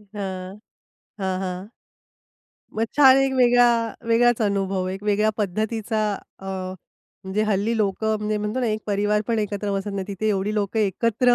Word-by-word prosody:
हां. 190 -1 -5 0.6
हां, 190 -1 -1
हां. 185 +1 -4 1.1
मग 225 - +2
छान 270 -2 +8
एक 270 0 +2
वेगळा 245 -1 +5 0.4
वेगळाच 240 +1 +4
अनुभव, 195 -2 0
एक 190 +2 -5
वेगळ्या 210 +1 +2
पद्धतीचा 215 +2 -1 0.4
अ, 195 - -9 0.8
म्हणजे 195 +3 -1
हल्ली 215 +2 0
लोकं 215 +1 0
म्हणजे 210 0 -1
म्हणतो 210 +5 -2
ना, 245 - 0
एक 215 -1 -1
परिवार 205 0 +1
पण 230 - +1
एकत्र 205 -1 -2
बसत 195 +1 -2
नाही. 195 -1 -3
तिथे 205 +2 -2
एवढी 205 +1 0
लोकं 210 +1 -1
एकत्र 230 +4 +2
210 Hz, 155 wpm, -23 LUFS, 195-225 Hz, 1.1 s, छान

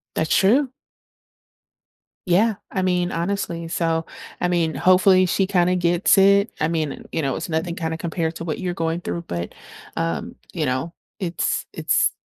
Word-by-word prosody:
That's 160 - 0
true. 255 +8 +4 1.6
Yeah. 200 +5 +3 0.2
I 190 - -1
mean, 180 -1 +1
honestly. 170 -1 -2
So, 165 -1 0 0.3
I 180 - +1
mean, 170 -3 0
hopefully, 185 0 +5
she 190 +1 +1
kinda 180 -2 +2
gets 175 +2 +3
it. 200 +2 +5
I 150 - +2
mean, 160 -3 -3
you 160 - -1
know, 135 -2 -1
it's - - -5
nothing 165 +2 -1
kinda 160 -1 -3
compared 165 -1 -2
to 165 - -6
what 160 -2 -3
you're 180 -2 -2
going 165 0 -2
through, 170 -1 -4
but, 85 - -5 0.4
um, 215 +9 -2 0.2
you 160 -4 -1
know, 130 +6 -2 0.3
it's 175 -3 -1
it's - - +2
175 Hz, 160 wpm, -22 LUFS, 165-185 Hz, 1.6 s, hopefully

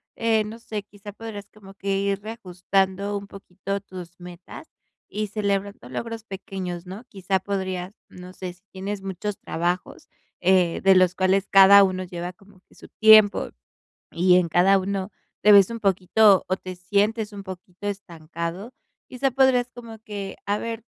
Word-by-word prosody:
eh, 225 -1 +1
no 215 +2 -8
sé, 215 -3 -6
quizá 205 0 -12
podrás 210 -2 -8
como 195 -2 -15
que 195 0 -2
ir 200 0 -1
reajustando 195 -1 -2
un 200 0 -8
poquito 195 0 -6
tus 180 -3 -11
metas 175 0 -11 0.4
y 215 0 -3
celebrando 200 - -3
logros 230 - -5
pequeños, 190 -4 -6
¿no? 190 +5 -9
Quizá 190 -1 -1
podrías, 190 -1 -4 0.2
no 180 0 -12
sé, 185 -1 -7
si 180 - -28
tienes 195 +1 -5
muchos 195 +1 -5
trabajos, 175 +2 -3 0.3
eh, 180 -2 +2
de 195 0 +6
los 185 -1 +4
cuales 190 +1 +1
cada 200 0 +8
uno 185 -1 -1
lleva 175 0 -6
como 195 0 -22
que - - -24
su - - -14
tiempo, 215 -2 +5 0.6
y 180 +1 +4
en 180 -2 +2
cada 185 +4 +4
uno 195 +1 -3 0.3
te 210 - +7
ves 200 -2 +7
un 230 0 -6
poquito 195 +1 +4
o 185 - 0
te 185 -1 -9
sientes 205 +4 0
un 200 -1 -8
poquito 185 0 -10
estancado. 170 +1 -6 0.4
Quizá 265 +2 -1
podrías 255 -1 +3
como 235 -2 -11
que 200 -3 -7
a 205 +1 0
ver, 230 0 -5
195 Hz, 165 wpm, -24 LUFS, 185-210 Hz, 0.6 s, cada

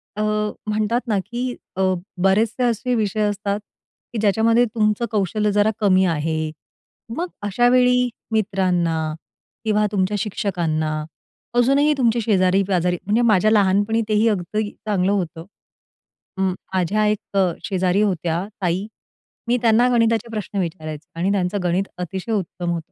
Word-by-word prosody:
अ, 210 - -2 0.5
म्हणतात 215 +3 0
ना 215 -3 +1
की 240 +1 -5 0.3
अ, 190 - -1 0.4
बरेचसे 215 +6 +2
असे 240 +1 0
विषय 215 -1 0
असतात, 205 -1 -1 0.5
की - - -3
ज्याच्यामध्ये 225 +3 +3
तुमचं 215 +1 +1
कौशल्य 210 0 0
जरा 205 +1 +3
कमी 190 -3 +4
आहे. 155 -1 -1 0.7
मग 345 +2 -1 0.2
अशावेळी 250 +3 +3 0.2
मित्रांना 185 -6 +1 0.7
किंवा 210 -1 +2
तुमच्या 200 0 0
शिक्षकांना, 170 -6 -1 0.7
अजूनही 275 +5 +4
तुमच्या 235 -2 +2
शेजारी 190 -2 +3
पाजारी 180 -2 +1
म्हणजे 210 +4 +2
माझ्या 215 -3 +4
लहानपणी 205 +2 +3
तेही 215 +1 +3
अगदी 205 +2 -1
चांगलं 200 -3 -1
होतं. 170 -4 -2 0.9
अं, 190 0 +1 0.3
माझ्या 195 +4 +1
एक 210 -1 -2 0.3
शेजारी 185 +1 +1
होत्या 175 -3 0 0.2
ताई, 180 +2 0 0.6
मी 245 +1 +2
त्यांना 230 +1 +4
गणिताचे 230 -1 +2
प्रश्न 210 -2 -4
विचारायचे 160 -2 -5
आणि 185 +3 +1
त्यांचं 195 0 0
गणित 180 +2 +1
अतिशय 185 +4 -4
उत्तम 180 -3 -3
होतं. 170 -2 -5
205 Hz, 130 wpm, -21 LUFS, 185-220 Hz, 0.9 s, कमी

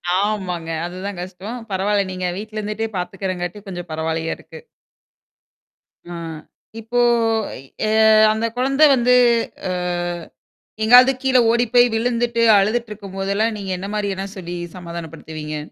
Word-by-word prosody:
ஆமாங்க. 185 -5 -1 0.2
அது 175 +1 -7
தான் 200 -3 -5
கஷ்டம். 190 +6 -7
பரவால்ல, 200 +1 +1
நீங்க 185 0 -4
வீட்ல 215 +1 -6
இருந்துட்டே 215 +1 -3
பாத்துக்கறதுனால 180 0 -4
கொஞ்சம் 175 -2 -7
பரவாயில்லையா 160 +1 -2
இருக்கு. - - -13 1.5
ஆ. - - -5 0.7
இப்போ 240 +2 -2 0.9
எ - - +1 0.4
அ - - +4
அந்த 220 +1 -1
குழந்தை 270 +4 +3
வந்து 250 0 +3 0.6
அ - - -1 1.1
எங்காவது 250 +4 +8
கீழ 260 -1 +3
ஓடிப் 235 -1 +1
போய் 245 0 +7
விழுந்துட்டு 235 0 0 0.2
அழுதுட்டு 220 +4 +1
இருக்கும் 200 -2 -9
போது 195 0 -2
எல்லாம் 220 +1 +1
நீங்க 195 -1 -5
என்ன 195 +2 -6
மாதிரி 205 -1 -1
எல்லாம் 195 +2 -6
சொல்லி 175 -1 -6 0.2
சமாதானப்படுத்துவீங்க? 165 -3 -7
200 Hz, 135 wpm, -20 LUFS, 180-230 Hz, 1.5 s, எங்காவது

